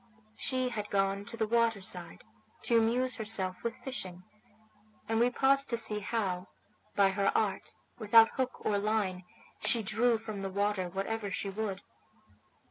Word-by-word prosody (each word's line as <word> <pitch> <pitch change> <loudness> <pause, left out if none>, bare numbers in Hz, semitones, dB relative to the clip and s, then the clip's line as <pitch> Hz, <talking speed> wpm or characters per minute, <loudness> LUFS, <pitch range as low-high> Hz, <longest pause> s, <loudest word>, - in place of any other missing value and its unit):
She 255 0 -1
had 210 -3 -5
gone 195 0 0
to 230 - -9
the 220 - +1
water 230 -1 +2
side 175 -3 -5 0.4
to 235 - +2
amuse 245 +2 +1
herself 200 -4 -1
with 235 -1 -3
fishing, 185 -9 -7 0.8
and 225 0 +1
we 240 +1 +4
paused 275 +2 +4
to 235 - 0
see 215 -2 +2
how, 195 -4 -2 0.5
by 200 -1 +5
her 195 +1 +1
art, 200 -3 -2 0.2
without 225 +1 +6
hook 260 -1 -3
or 205 -1 +2
line, 200 -4 -1 0.4
she 230 -2 +3
drew 230 +3 +2
from 215 -2 -7
the 195 - -3
water 200 -1 -1
whatever 200 +3 -3
she 195 +1 -3
would. 200 -1 -4
215 Hz, 155 wpm, -31 LUFS, 195-230 Hz, 0.8 s, without